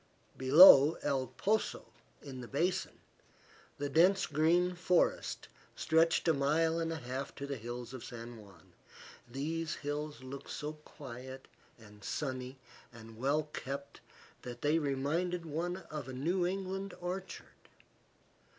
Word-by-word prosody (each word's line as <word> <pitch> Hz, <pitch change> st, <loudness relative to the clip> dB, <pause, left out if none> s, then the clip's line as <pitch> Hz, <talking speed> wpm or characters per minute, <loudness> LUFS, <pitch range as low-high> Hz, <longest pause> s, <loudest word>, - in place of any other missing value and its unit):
Below 145 Hz, +2 st, +9 dB
El 135 Hz, -3 st, 0 dB
Poso, 205 Hz, -, -1 dB, 0.4 s
in 130 Hz, -3 st, -8 dB
the 120 Hz, -, -8 dB
basin, 170 Hz, +8 st, -1 dB, 0.8 s
the 145 Hz, -, -2 dB
dense 185 Hz, +6 st, +4 dB
green 170 Hz, +4 st, +2 dB
forest 180 Hz, 0 st, +1 dB, 0.3 s
stretched 165 Hz, +1 st, +2 dB
a 165 Hz, -, +5 dB
mile 160 Hz, +4 st, +2 dB
and 165 Hz, 0 st, -1 dB
a -, -, -2 dB
half 130 Hz, 0 st, -5 dB
to 140 Hz, -, -5 dB
the 140 Hz, 0 st, -4 dB
hills 120 Hz, +1 st, -7 dB
of 130 Hz, -, -7 dB
San 120 Hz, 0 st, -8 dB
Juan. 100 Hz, -3 st, -17 dB, 0.6 s
These 155 Hz, +5 st, -3 dB
hills 145 Hz, -1 st, -5 dB
looked 135 Hz, +1 st, -8 dB
so 150 Hz, +1 st, -4 dB
quiet 130 Hz, -3 st, -10 dB, 0.3 s
and 105 Hz, -3 st, -16 dB
sunny 130 Hz, -1 st, -4 dB, 0.3 s
and 115 Hz, -1 st, -12 dB
well 140 Hz, +6 st, +1 dB
kept 140 Hz, +1 st, -6 dB, 0.4 s
that 120 Hz, -1 st, -8 dB
they 150 Hz, +3 st, +3 dB
reminded 160 Hz, +5 st, -1 dB
one 170 Hz, +4 st, -3 dB
of 150 Hz, -4 st, -5 dB
a -, -, -6 dB
New 175 Hz, +7 st, 0 dB
England 195 Hz, +1 st, -4 dB
orchard. 180 Hz, +2 st, -7 dB
145 Hz, 130 wpm, -33 LUFS, 130-165 Hz, 0.8 s, Below